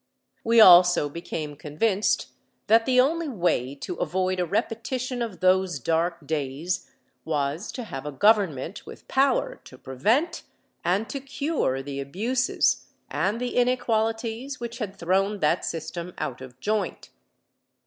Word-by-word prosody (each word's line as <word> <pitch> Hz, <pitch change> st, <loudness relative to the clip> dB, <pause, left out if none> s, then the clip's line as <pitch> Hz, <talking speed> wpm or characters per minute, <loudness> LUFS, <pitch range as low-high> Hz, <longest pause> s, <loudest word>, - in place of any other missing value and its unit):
We 230 Hz, 0 st, +4 dB
also 180 Hz, -6 st, +8 dB
became 155 Hz, -1 st, -5 dB
convinced 190 Hz, +8 st, 0 dB, 0.4 s
that 225 Hz, +2 st, +4 dB
the 255 Hz, -1 st, +4 dB
only 320 Hz, +5 st, +2 dB
way 170 Hz, -, 0 dB
to 170 Hz, +5 st, -6 dB
avoid 185 Hz, 0 st, -1 dB
a 180 Hz, -, 0 dB
repetition 245 Hz, +5 st, -2 dB
of 225 Hz, -6 st, -4 dB
those 185 Hz, -2 st, +3 dB
dark 165 Hz, +3 st, -1 dB
days 155 Hz, +5 st, -3 dB, 0.3 s
was 150 Hz, +4 st, -2 dB
to 250 Hz, -, -5 dB
have 140 Hz, -9 st, -7 dB
a -, -, -3 dB
government 190 Hz, -2 st, +2 dB
with -, -, -12 dB
power 270 Hz, -1 st, +1 dB
to 130 Hz, -, -13 dB
prevent 225 Hz, -, 0 dB, 0.4 s
and 195 Hz, +6 st, +1 dB
to 275 Hz, -, -3 dB
cure 275 Hz, -, -2 dB
the 140 Hz, 0 st, -5 dB
abuses 225 Hz, -, 0 dB, 0.2 s
and 205 Hz, +4 st, 0 dB
the 250 Hz, 0 st, -3 dB
inequalities 235 Hz, +1 st, 0 dB
which 235 Hz, 0 st, -6 dB
had 205 Hz, -4 st, -4 dB
thrown 195 Hz, +4 st, +1 dB
that 150 Hz, +4 st, +2 dB
system 170 Hz, +2 st, -5 dB
out 130 Hz, -1 st, -4 dB
of 130 Hz, -1 st, -11 dB
joint. 215 Hz, +5 st, -2 dB
190 Hz, 140 wpm, -25 LUFS, 155-235 Hz, 0.4 s, also